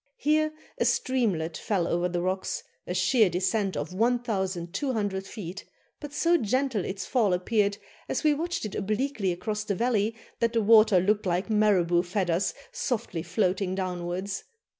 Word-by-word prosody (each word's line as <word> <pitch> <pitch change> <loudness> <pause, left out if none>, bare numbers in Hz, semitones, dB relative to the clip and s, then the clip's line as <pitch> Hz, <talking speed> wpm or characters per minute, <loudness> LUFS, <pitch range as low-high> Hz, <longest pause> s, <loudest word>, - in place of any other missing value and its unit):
Here 310 +1 +2 0.3
a - - +2
streamlet 195 -11 +1
fell 190 -5 0
over 175 +1 0
the 175 0 -2
rocks, 185 +1 -2 0.2
a 180 - -2
sheer 210 +3 +4
descent 190 +3 0
of 150 +5 -4
1,200 205 -1 -1
feet, 190 -3 -7 0.4
but 295 -2 -7
so 340 +3 +3
gentle 255 - 0
its 190 +1 -4
fall 220 -7 +2
appeared, 200 +2 +1 0.3
as - - -1
we 305 -1 +5
watched 335 -2 -2
it 210 - -5
obliquely 215 0 -1
across 210 +4 -3
the 205 -2 -2
valley, 225 -1 +1 0.2
that 230 0 +1
the 230 - +2
water 215 -2 +6
looked 205 +2 +1
like 180 +5 0
marabout 185 -5 +3
feathers 180 -1 0 0.2
softly 240 - -2
floating 185 0 0
downwards. 185 +1 -3
205 Hz, 150 wpm, -27 LUFS, 180-230 Hz, 0.4 s, water